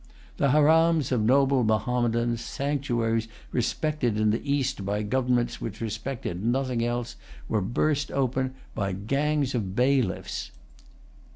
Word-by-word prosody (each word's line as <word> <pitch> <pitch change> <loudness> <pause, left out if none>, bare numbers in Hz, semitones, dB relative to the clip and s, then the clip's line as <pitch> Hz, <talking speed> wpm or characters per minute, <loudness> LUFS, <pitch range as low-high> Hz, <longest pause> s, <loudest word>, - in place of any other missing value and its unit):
The 140 - +2
harams 155 0 +4
of 125 -4 +2
noble 135 +3 +3
Mahommedans, 120 +1 +1
sanctuaries 120 -6 -1 0.2
respected 125 -1 0
in 110 0 +3
the 110 - -1
East 135 -7 0
by 100 +2 -1
governments 125 +1 0
which 110 -1 -5
respected 110 -4 -4
nothing 125 0 0
else, 120 0 -2 0.3
were 110 - 0
burst 145 +8 0
open 130 -1 0 0.2
by 100 -2 -2
gangs 140 +7 0
of 100 -6 -2
bailiffs. 125 -4 0
125 Hz, 120 wpm, -26 LUFS, 110-140 Hz, 0.3 s, harams